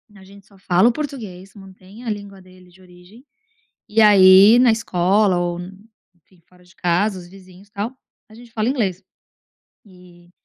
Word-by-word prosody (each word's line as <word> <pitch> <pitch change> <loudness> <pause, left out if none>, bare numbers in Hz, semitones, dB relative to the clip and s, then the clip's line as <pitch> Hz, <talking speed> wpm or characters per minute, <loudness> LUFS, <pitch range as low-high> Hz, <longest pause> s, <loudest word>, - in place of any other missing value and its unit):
a 190 - -17
gente 200 +1 -18
só 200 - -23
fala 185 +4 +2
o - - 0
português, 215 -11 -8
mantém 195 +3 -16
a - - -4
língua 200 -2 -8
dele 185 0 -20
de 185 +1 -23
origem, 180 +7 -19 0.7
e 220 +1 0
aí 200 +2 +6
na 245 -2 +4
escola 195 -2 0
ou 175 0 -3 0.6
enfim 175 +1 -30
fora 180 0 -25
de 180 +1 -24
casa 185 +3 -1
os 175 - -13
vizinhos 190 +1 -18
tal, 225 +6 -6 0.3
a 220 - -17
gente 235 0 -16
fala 220 +1 -2
inglês." 200 -8 -3 0.9
E 180 -2 -20
190 Hz, 165 wpm, -19 LUFS, 180-215 Hz, 0.9 s, aí